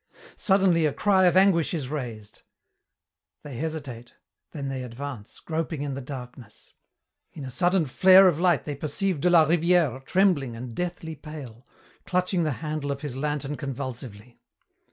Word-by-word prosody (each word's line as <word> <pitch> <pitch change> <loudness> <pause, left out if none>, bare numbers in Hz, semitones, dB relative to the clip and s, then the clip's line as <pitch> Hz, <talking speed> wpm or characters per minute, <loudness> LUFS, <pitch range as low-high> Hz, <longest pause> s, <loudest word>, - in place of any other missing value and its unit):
Suddenly 190 -5 +3
a 145 - -2
cry 190 -2 +3
of 180 0 +4
anguish 185 -4 +3
is 145 -6 -3
raised. 115 -8 -6 1.0
They 145 -4 -8
hesitate, 140 -6 -6 0.4
then 140 -3 -5
they 135 -1 -4
advance, 125 -2 -8
groping 160 -2 -3
in 140 -1 -3
the 135 - -5
darkness. 125 -4 -10 0.6
In 145 - -8
a 130 - -7
sudden 180 +3 +2
flare 185 +7 +7
of 165 -4 +1
light 175 -4 +2
they 150 - -3
perceive 155 +3 -2
de 180 - +3
la 170 -3 +6
Rivière 165 -4 +2
trembling 165 -9 +1
and 120 +1 -7
deathly 170 +1 -4
pale, 140 -6 -10 0.4
clutching 180 0 0
the 155 -3 0
handle 150 -2 -3
of 140 0 -5
his 145 -4 -5
lantern 145 0 -2
convulsively. 125 -5 -7
150 Hz, 155 wpm, -25 LUFS, 130-175 Hz, 1.0 s, flare